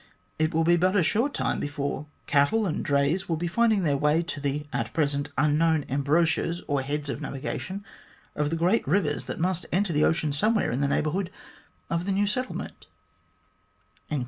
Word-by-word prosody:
It 155 0 +2
will 165 -1 +2
be 175 +1 +4
but 185 +3 +2
a 190 - +4
short 230 - +2
time - - -1
before 145 0 -3 0.2
cattle 145 +11 +3
and 175 - -2
drays 145 +6 +1
will 165 - +1
be 165 +2 -3
finding 215 +2 +2
their 145 -4 +2
way 150 +4 +2
to 165 -3 -4
the 145 +1 -2
at 115 -1 -2
present 145 -2 0
un 150 +2 +3
known 160 -3 +2
embouchures, 160 +5 +1
or 145 -2 +1
heads 145 +2 -3
of 135 - -4
navigation 190 +8 -5 0.5
of 150 -1 0
the 165 - -1
great 175 +5 +1
rivers 150 -2 +1
that - - -5
must 180 +1 0
enter 190 -1 +1
the 150 +1 +3
ocean 155 -2 +1
somewhere 215 +9 +2
in 125 +4 -1
the 140 - +2
neighbourhood 165 +6 0 0.6
of 170 +2 -2
the - - +1
new 200 +2 +2
settlement." 250 +5 -4
160 Hz, 185 wpm, -26 LUFS, 145-185 Hz, 0.6 s, be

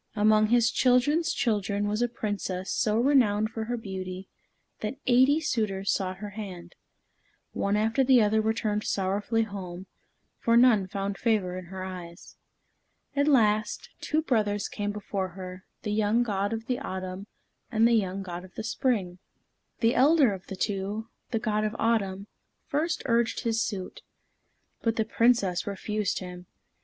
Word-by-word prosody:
Among 215 +1 +4
his 235 0 +4
children's 280 +6 +3
children 205 -3 0
was 210 +2 -1
a 240 - +3
Princess 205 -5 -3
so 215 0 +1
renowned 230 -5 +3
for 225 -1 -4
her 240 +2 -2
beauty 190 -3 -6 0.5
that 215 +5 -4
eighty 260 +4 +5
suitors 215 -10 -1
sought 185 -2 -2
her 205 +1 -7
hand. 185 -5 -8 0.8
One 200 +1 0
after 225 +5 +2
the 260 -1 +6
other 220 0 +3
returned 215 -1 0
sorrowfully 205 +4 0
home, 190 -3 -7 0.5
for 230 0 +3
none 235 -6 +5
found 195 0 -3
favor 210 -6 +1
in 185 0 -6
her 185 +2 -7
eyes. 180 -2 -9 0.8
At 285 +1 +2
last, 215 -6 +2
two 310 +1 0
brothers 210 -7 0
came 205 0 -3
before 200 -2 -3
her, 185 +1 -8 0.2
the 210 - -2
young 215 +3 +2
God 200 -3 -1
of 225 0 -4
the 250 +1 -1
Autumn, 185 -4 -5 0.4
and 225 0 +4
the 235 - +3
young 195 -3 0
God 175 -1 -6
of 185 - -15
the - - -4
Spring. 215 -7 -1 0.6
The 230 +1 +4
elder 275 -3 +5
of 190 -1 -9
the 195 - -6
two, 205 +3 -2 0.2
the 230 - 0
God 215 -1 0
of 215 +1 -2
Autumn, 200 -4 0 0.4
first 325 +3 -1
urged 235 -2 +1
his 225 -1 0
suit. 190 -5 -4 0.8
But 230 -1 +1
the 220 - +1
Princess 215 -8 +2
refused 205 +1 -2
him. 180 -1 -8
210 Hz, 155 wpm, -27 LUFS, 195-230 Hz, 0.8 s, the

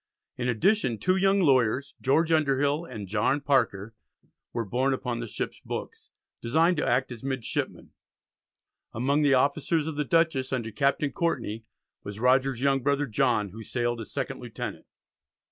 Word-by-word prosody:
In 125 0 -2
addition 125 - +2
two 185 - +1
young 195 +1 +3
lawyers, 130 -3 +2
George 160 +5 +2
Underhill 145 0 +2
and 105 - -7
John 110 +8 +1
Parker, 115 -7 0 0.6
were 115 -1 -2
borne 130 +6 +1
upon 125 -2 -4
the 120 - -4
ship's - - -5
books, - - -7 0.3
"designed 165 +9 +2
to - - 0
act 125 +2 +1
as 120 -1 -8
midshipmen." 130 -4 -3 1.0
Among 140 +5 +1
the 140 -2 +4
officers 145 +4 +1
of 155 -2 -4
the 150 - +1
Dutchess 150 -4 +1
under 120 -4 -2
Captain 140 +6 +1
Courtney, 115 -9 -2 0.4
was 100 +1 -7
Rogers's 130 +1 +2
young 135 -1 +3
brother, 140 +2 +1
John, 115 -4 +1
who 110 +5 -10
sailed 120 0 -2
as 110 - -9
second - - -3
lieutenant. - - -7
130 Hz, 155 wpm, -27 LUFS, 115-145 Hz, 1.0 s, the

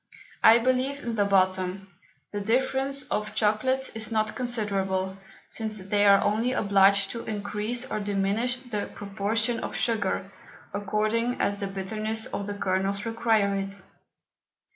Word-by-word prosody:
I 225 +1 +8
believe 255 +3 0
in 235 - -3
the 205 -2 +2
bottom, 190 0 0 0.4
the 205 - -2
difference 265 +5 +1
of 210 0 -2
Chocolates 260 +5 +1
is 220 +1 -4
not 215 -1 0
considerable, 195 -6 -1 0.3
since 220 -1 -2
they 205 +1 +1
are 200 0 +6
only 230 +4 +1
obliged 200 -2 +4
to 230 - -5
encrease 210 +3 -2
or 235 - -3
diminish 205 +5 0
the 245 -5 -5
Proportion 215 +3 -1
of - - -5
Sugar, 205 -4 -1 0.4
according 215 +4 0
as 200 0 +1
the 200 - -2
Bitterness 215 +3 -1
of 200 - -5
the 205 - -4
Kernels 195 +1 -1
require 225 -3 +1
it. 195 0 0
210 Hz, 140 wpm, -26 LUFS, 200-230 Hz, 0.4 s, I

